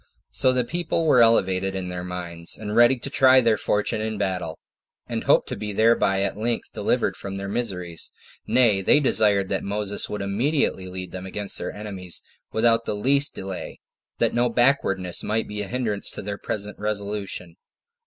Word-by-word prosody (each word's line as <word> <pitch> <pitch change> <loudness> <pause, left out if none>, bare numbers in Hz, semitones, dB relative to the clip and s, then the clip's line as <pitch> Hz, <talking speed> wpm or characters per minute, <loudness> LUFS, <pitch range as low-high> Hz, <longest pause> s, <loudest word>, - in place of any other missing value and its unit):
So 130 - +4
the 125 -1 +1
people 165 +4 -1
were 130 -6 +5
elevated 95 -4 +3
in 95 -1 -3
their 90 0 -5
minds, 85 -2 -5
and 105 0 -5
ready 120 +3 +6
to 120 - -6
try 130 -2 +6
their 115 -3 +3
fortune 105 +1 0
in 110 0 -3
battle, 90 -5 -2 0.5
and - - -4
hoped - - +4
to - - -3
be 105 -1 -4
thereby 100 -3 +3
at 100 - -1
length 115 +3 -2
delivered - - 0
from 95 0 -6
all - - -4
their 100 0 -5
miseries: 95 -6 -3 0.4
nay, 115 -6 +4
they 120 - +5
desired 105 -8 +3
that 95 - -1
Moses 100 0 -1
would 105 -1 -3
immediately 105 -1 0
lead 90 -1 -6
them 95 0 -6
against 100 +1 -2
their - - -4
enemies 95 -4 -6 0.3
without 115 0 +2
the - - -1
least 140 +7 +2
delay, 95 -1 -6 0.4
that - - +1
no 120 0 +2
backwardness 115 -8 +1
might 110 +1 -1
be 105 0 -4
a 100 - -4
hindrance 110 -4 -1
to - - -5
their 100 0 -5
present 105 -1 -4
resolution. 100 -4 -3
105 Hz, 185 wpm, -24 LUFS, 95-115 Hz, 0.5 s, ready